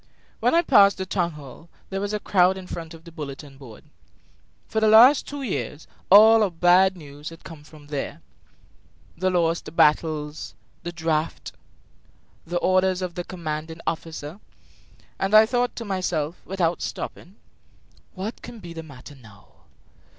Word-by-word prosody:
When - - +2
I 340 - +4
passed 200 -10 +5
the 190 - -4
town 175 -3 -1
hall 150 +3 -13 0.2
there 195 0 -3
was 205 0 -3
a 210 - -2
crowd 190 -2 +2
in 190 - -8
front 165 -2 -7
of 165 - -16
the 170 - -13
bulletin 140 -2 -9
board. 120 -6 -13 0.8
For 220 - -1
the 220 - +2
last 240 +6 +7
two 285 -1 -6
years 170 - -4 0.2
all 220 +3 +8
our 210 - +2
bad 180 +2 +3
news 145 -1 -10
had 165 0 -14
come 160 -3 -11
from 150 -1 -16
there 145 -2 -5 0.9
the 185 +2 0
lost 170 -2 -1
battles, 150 -1 +1 0.3
the 175 - -5
draft, 160 -2 -2 1.0
the 175 +1 -2
orders 185 +1 +1
of 180 -1 -4
the 175 0 -5
commanding 160 -2 -6
officer 160 +1 -5 0.8
and 195 +2 +1
I 215 +1 +9
thought 245 +1 -1
to 230 - -6
myself, 180 -5 -2
without 175 -3 -1
stopping: 185 +3 -6 0.8
"What 200 +5 -6
can 240 0 -10
be 175 -5 -10
the 165 - -7
matter 145 -3 -13
now?" 110 -7 -18
175 Hz, 160 wpm, -24 LUFS, 155-195 Hz, 1.0 s, I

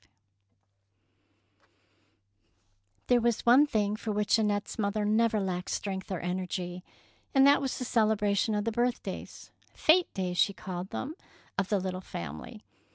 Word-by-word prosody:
V'' 95 - -30 3.0
There 245 -1 +3
was 235 -1 0
one 260 +5 +6
thing 210 -5 0
for 215 0 -4
which 210 +2 +2
An 215 - +2
nette's 205 +2 -2
mother 205 0 0
never 220 +1 +2
lacked 185 -2 -3
strength 190 -1 -4
or 185 - -2
energy, 180 0 -4 0.5
and 270 0 +7
that 285 +1 +6
was 270 -2 -2
the 250 - -4
celebra 215 -3 +2
tion 215 +2 +1
of 205 - 0
the 230 - 0
birthdays 240 +2 -3
— - - -31
"fete 345 +3 +4
days," 180 -2 -2
she 200 - +4
called 185 -1 -6
them 285 +4 -4 0.2
— - - -29
of 195 - -1
the 205 -3 +2
little 185 0 -4
fam 80 - -6
ily. - - -11
205 Hz, 165 wpm, -29 LUFS, 185-230 Hz, 3.0 s, and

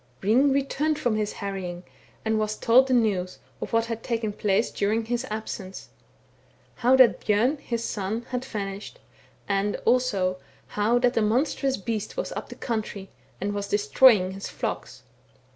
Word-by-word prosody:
" 125 - -35
Hring 250 +8 +4
returned 280 +3 0
from 245 -7 0
his 215 -1 -1
harrying, 185 -3 -5 0.4
and 220 - +1
he 220 - +1
was 215 0 -1
told 255 +3 +5
the 260 - +1
news, 195 -6 +1 0.2
of - - -5
what 230 0 +2
had 230 -1 -4
taken 225 -3 -2
place 205 +2 +1
during 220 +3 0
his 240 +3 -2
absence; 210 -3 -6 0.9
how 250 +1 +4
that 260 -3 +5
Bjom, 240 +8 +2
his 235 -3 -3
son, 210 +2 -3
had 250 0 -2
vanished, 205 - -6 0.5
and 200 +1 0
also, 205 -7 +2 0.3
how 215 +4 +2
that 245 0 +2
a - - +4
monstrous 265 +4 +1
beast 215 - -4
was - - -2
up - - -6
the - - -8
country, 215 -4 -4 0.3
and 205 +2 -2
was 200 0 -3
destroying 205 -1 +4
his 195 +1 -6
flocks. - - -5
220 Hz, 165 wpm, -26 LUFS, 200-245 Hz, 0.9 s, told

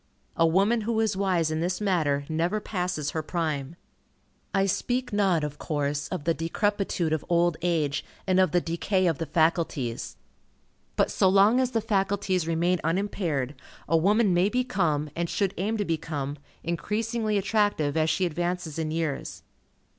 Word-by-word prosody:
A 165 - +4
woman 200 +7 +3
who 220 +1 -1
is 220 -2 +1
wise 185 -5 +1
in 155 - -1
this 180 +2 -1
matter, 155 -9 +1
never 170 +6 0
passes 180 -8 -2
her 160 - -2
prime. 155 -3 -3 0.8
I 195 0 +2
speak 245 +5 -1
not, 190 -6 +2
of 150 -1 -4
course, 145 -1 -2
of 185 -6 -4
the 165 - +2
decrepitude 175 0 -1
of 160 - -1
old 170 -1 +3
age 160 -5 0 0.2
and 185 -1 +3
of 185 - +4
the 175 - +3
decay 185 +3 0
of 165 -5 +1
the 165 - -3
faculties. 150 - 0 0.8
But - - +2
so 190 - +3
long 200 +6 +5
as 260 -1 +2
the 230 -3 0
faculties 195 -4 0
remain 170 +2 +1
unimpaired, 165 -6 -1 0.3
a 165 - +2
woman 200 +4 +3
may 180 +3 +3
become, 190 - 0
and 170 0 -2
should 195 -2 0
aim 215 +5 -1
to 205 - -1
become, 150 -4 -3 0.2
increasingly 215 +5 -1
attractive, 200 -8 +1
as 160 0 +2
she 185 +3 +1
advances 175 -1 -2
in 160 -1 -1
years. 160 -3 -3
175 Hz, 160 wpm, -27 LUFS, 160-200 Hz, 0.8 s, long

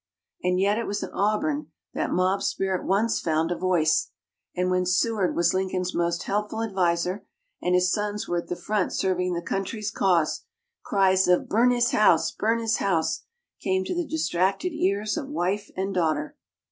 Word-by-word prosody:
And 180 0 +1
yet 200 +3 +2
it 235 - -3
was 205 - -2
in - - -6
Auburn 290 +9 0 0.3
that - - -1
mob 185 +2 +1
spirit 190 -2 -1
once 215 +4 +2
found 160 +1 0
a - - +1
voice; 170 - +1 0.5
and 180 0 0
when 185 0 +2
Seward 190 +2 +1
was 170 0 +2
Lincoln's 185 -1 -1
most 170 0 0
helpful 210 +2 -2
adviser, 180 -2 0 0.4
and 180 0 +1
his 180 0 +3
sons 210 0 -2
were 175 - 0
at - - -8
the 175 - -3
front 205 0 -1
serving 180 -1 0
the 170 0 -3
country's 205 +4 -3
cause, 175 -5 +1 0.4
cries 190 -1 +3
of 180 0 +3
"Burn 235 +4 +3
his 240 -1 +2
house! 215 - +4
Burn 225 +2 0
his 225 -1 0
house!" 170 -5 0 0.4
came 190 0 0
to - - -2
the 350 -3 -2
distracted 200 - 0
ears 210 -6 0
of 290 -4 -4
wife 205 -6 -2
and 195 +1 -2
daughter. 155 -4 0
190 Hz, 175 wpm, -25 LUFS, 180-210 Hz, 0.5 s, house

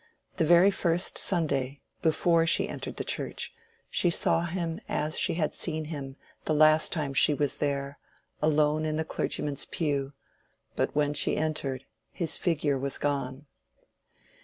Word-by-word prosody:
The 160 - +2
very 175 +4 +6
first 175 -2 0
Sunday, 140 -6 -1 0.2
before 165 +1 +3
she - - +4
entered - - -6
the - - -2
church, - - -2 0.4
she 175 - +2
saw 170 0 +2
him 170 -1 -3
as 155 +1 0
she - - +2
had 155 -3 0
seen 155 -2 -1
him 135 -2 -6 0.3
the 155 - +1
last 155 +1 +5
time 150 -4 -2
she 145 +2 +4
was 145 -1 -1
there, 140 -1 -2 0.4
alone 155 0 +2
in 155 0 -1
the 160 +1 -1
clergyman's 145 -2 -2
pew; 140 -4 -2 0.6
but - - -1
when 145 0 +1
she - - +2
entered 145 -4 -2 0.3
his 170 -3 -1
figure 150 -5 0
was 140 +1 -3
gone. 140 -1 -2
155 Hz, 150 wpm, -28 LUFS, 140-165 Hz, 0.6 s, very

